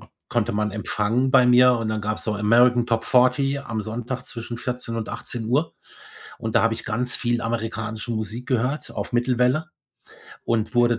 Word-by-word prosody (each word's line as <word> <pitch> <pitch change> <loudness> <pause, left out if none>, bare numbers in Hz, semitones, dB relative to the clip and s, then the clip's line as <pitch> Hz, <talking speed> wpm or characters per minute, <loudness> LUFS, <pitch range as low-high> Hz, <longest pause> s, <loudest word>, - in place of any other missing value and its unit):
k - - -17 0.2
konnte - - 0
man 105 +1 0
empfangen 110 +4 0
bei 125 - +6
mir, 125 +1 +6
und 115 -1 -2
dann 110 0 -1
gab's 105 +1 -3
so 110 - -1
American 120 +3 +4
Top 115 -1 0
Fourty 130 +3 +3
am 115 -6 -4
Sonntag, 120 +4 -4
zwischen 120 0 -6
14:00 125 -1 -4
und 115 -1 -4
18:00, 125 +7 -2 0.6
und 110 -1 -2
da - - +5
habe 115 0 +2
ich - - -8
ganz 125 +3 -1
viel 120 0 0
amerikanische 115 0 -3
Musik 110 +2 -4
gehört, 130 +3 -1
auf - - -5
Mittelwelle 125 +5 +1 0.8
und 115 -2 0
wurde 120 -1 +3
120 Hz, 175 wpm, -23 LUFS, 110-125 Hz, 0.8 s, bei